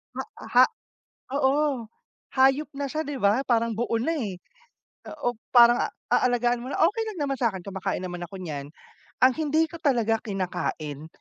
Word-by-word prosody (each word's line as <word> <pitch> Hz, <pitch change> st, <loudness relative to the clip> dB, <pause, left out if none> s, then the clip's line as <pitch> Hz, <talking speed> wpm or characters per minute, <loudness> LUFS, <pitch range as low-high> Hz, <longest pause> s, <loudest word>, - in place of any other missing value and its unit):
ma 265 Hz, -, -3 dB, 0.3 s
ha 250 Hz, +1 st, +7 dB, 0.7 s
oo, 275 Hz, -3 st, +1 dB, 0.5 s
hayop 270 Hz, +3 st, +4 dB
na 280 Hz, 0 st, -2 dB
siya, 310 Hz, -, -1 dB
di 290 Hz, -1 st, -4 dB
ba, 210 Hz, 0 st, +3 dB
parang 230 Hz, -1 st, +2 dB
buo 230 Hz, +1 st, -1 dB
na, 245 Hz, +9 st, 0 dB
eh. 220 Hz, -, -3 dB, 0.8 s
Oo, 245 Hz, -6 st, -2 dB, 0.2 s
parang 240 Hz, -1 st, +6 dB, 0.2 s
aalagaan 245 Hz, -1 st, +2 dB
mo 260 Hz, -, -6 dB
na. -, -, -3 dB
Okey 420 Hz, +7 st, +3 dB
lang 380 Hz, -, -9 dB
naman 275 Hz, -, -1 dB
sa 235 Hz, -3 st, +2 dB
akin 190 Hz, -2 st, -8 dB
kumakain 190 Hz, 0 st, -3 dB
naman 175 Hz, -1 st, -5 dB
ako 185 Hz, +3 st, -8 dB
niyan. 145 Hz, -5 st, -6 dB, 0.5 s
Ang 255 Hz, 0 st, +7 dB
hindi 315 Hz, +1 st, +1 dB
ko 325 Hz, -, -11 dB
talaga 230 Hz, -6 st, +2 dB
kinakain, 175 Hz, -, -4 dB
240 Hz, 165 wpm, -26 LUFS, 200-280 Hz, 0.8 s, ha